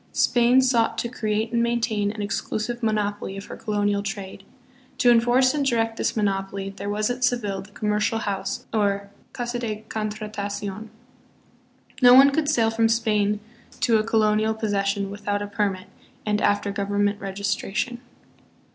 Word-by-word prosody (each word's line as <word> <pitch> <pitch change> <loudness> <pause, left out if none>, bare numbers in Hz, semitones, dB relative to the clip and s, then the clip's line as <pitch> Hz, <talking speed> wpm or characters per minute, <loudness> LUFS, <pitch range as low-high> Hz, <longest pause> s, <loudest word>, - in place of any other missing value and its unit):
Spain 245 +1 +4
sought 235 -3 +2
to 225 - -1
create 220 -2 -2
and 235 -1 +1
maintain 230 -3 0
an 210 -1 -5
exclusive 215 +4 -3
monopoly 205 -3 -1
of 195 - -7
her - - -8
colonial 205 -1 0
trade. 200 -2 -6 0.5
To 245 - +5
enforce 245 +2 +4
and 295 -1 0
direct 225 -4 0
this - - -1
monopoly, 195 -1 -1
there 200 - -5
was 210 +3 0
.at 250 +1 -4
Seville 210 -6 0
the 195 - -14
Commercial 210 +1 0
House, 200 -3 -3
or 200 -2 0 0.2
"Casa 240 0 -3
de 215 -3 -4
Contratacion." 210 -1 -4 1.1
No 245 0 +9
one 275 +2 +8
could 295 +1 0
sail 230 -7 +2
from 225 0 +2
Spain 210 -2 +1 0.4
to 230 -2 +4
a - - 0
colonial 220 0 +2
possession 200 -2 -1
without 205 0 -2
a - - -3
permit 200 -2 -2 0.4
and 210 0 0
after 205 0 +1
government 205 +1 0
registration. 200 +4 -2
215 Hz, 150 wpm, -24 LUFS, 205-230 Hz, 1.1 s, No